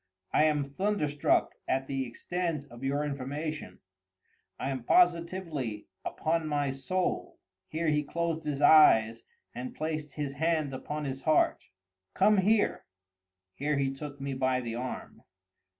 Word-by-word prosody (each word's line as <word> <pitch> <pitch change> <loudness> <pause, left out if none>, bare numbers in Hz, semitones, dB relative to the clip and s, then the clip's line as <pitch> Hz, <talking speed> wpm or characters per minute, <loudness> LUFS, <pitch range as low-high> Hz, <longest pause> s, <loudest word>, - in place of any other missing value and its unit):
"I 155 - +5
am 150 -2 +2
thunderstruck 150 0 +1
at 135 0 0
the 135 -1 -2
extent 165 +4 -3
of 120 +2 -11
your 140 +2 0
information—I 135 - -7
am 130 -3 -4
positively—upon 165 - 0
my 145 -2 0
soul." 135 +8 -2 0.3
[Here 160 +1 -1
he 150 -1 +2
closed 165 +2 -2
his 145 -2 -3
eyes 115 -8 +6 0.3
and 125 +1 -6
placed 155 -2 -3
his 145 -2 -3
hand 155 -1 0
upon 150 +3 -4
his 135 -1 -4
heart.] 155 +1 +2 0.5
"Come 210 +2 +5
here!" 205 +3 +2 0.7
[Here 145 +5 -1
he 135 -1 0
took 145 0 -8
me 135 0 -3
by 130 -1 +1
the 120 -2 -4
arm. 125 +2 -6
145 Hz, 130 wpm, -30 LUFS, 135-160 Hz, 0.7 s, eyes